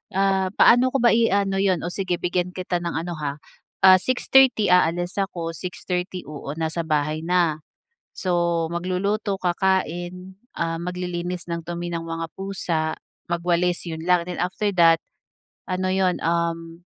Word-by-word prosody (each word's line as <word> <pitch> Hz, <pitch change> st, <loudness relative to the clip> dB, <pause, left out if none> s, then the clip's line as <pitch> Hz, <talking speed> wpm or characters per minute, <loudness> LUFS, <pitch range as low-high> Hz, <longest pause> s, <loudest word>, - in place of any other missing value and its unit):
ah, 195 Hz, -1 st, +2 dB
paano 245 Hz, +2 st, +6 dB
ko 250 Hz, -, +1 dB
ba 240 Hz, -, +6 dB
i-ano 200 Hz, -4 st, +2 dB
yun, 190 Hz, -3 st, +1 dB
oh, 170 Hz, -, -3 dB
sige 185 Hz, -1 st, -1 dB
bigyan 180 Hz, +1 st, -2 dB
kita 180 Hz, -1 st, -2 dB
ng 170 Hz, -1 st, -4 dB
ano 165 Hz, 0 st, -4 dB
ha, 145 Hz, -1 st, -3 dB, 0.5 s
ah, 185 Hz, -1 st, +8 dB
6:30 255 Hz, -3 st, +3 dB
aalis 175 Hz, +2 st, +2 dB
ako, 170 Hz, -4 st, -2 dB
6:30, 180 Hz, +1 st, -4 dB
oo, 145 Hz, 0 st, -7 dB
nasa 160 Hz, 0 st, -3 dB
bahay 155 Hz, 0 st, 0 dB
na. 170 Hz, -2 st, +1 dB, 0.6 s
So, 170 Hz, -2 st, 0 dB
magluluto, 190 Hz, +3 st, -2 dB
kakain, 180 Hz, 0 st, -1 dB, 0.2 s
ah, 165 Hz, 0 st, -2 dB
maglilinis 180 Hz, 0 st, -4 dB
ng 170 Hz, -1 st, -4 dB
dumi 175 Hz, 0 st, -4 dB
ng 165 Hz, -1 st, -4 dB
mga 165 Hz, 0 st, -3 dB
pusa, 170 Hz, -5 st, -2 dB, 0.3 s
magwalis 175 Hz, 0 st, 0 dB
'yon 160 Hz, +1 st, -6 dB
lang, 180 Hz, -1 st, +4 dB
then 180 Hz, 0 st, -6 dB
after 185 Hz, +3 st, -1 dB
that, 165 Hz, -1 st, +6 dB, 0.7 s
ano 185 Hz, 0 st, -1 dB
yun, 185 Hz, -1 st, +1 dB
um, 165 Hz, 0 st, -2 dB
175 Hz, 145 wpm, -23 LUFS, 165-185 Hz, 0.7 s, ah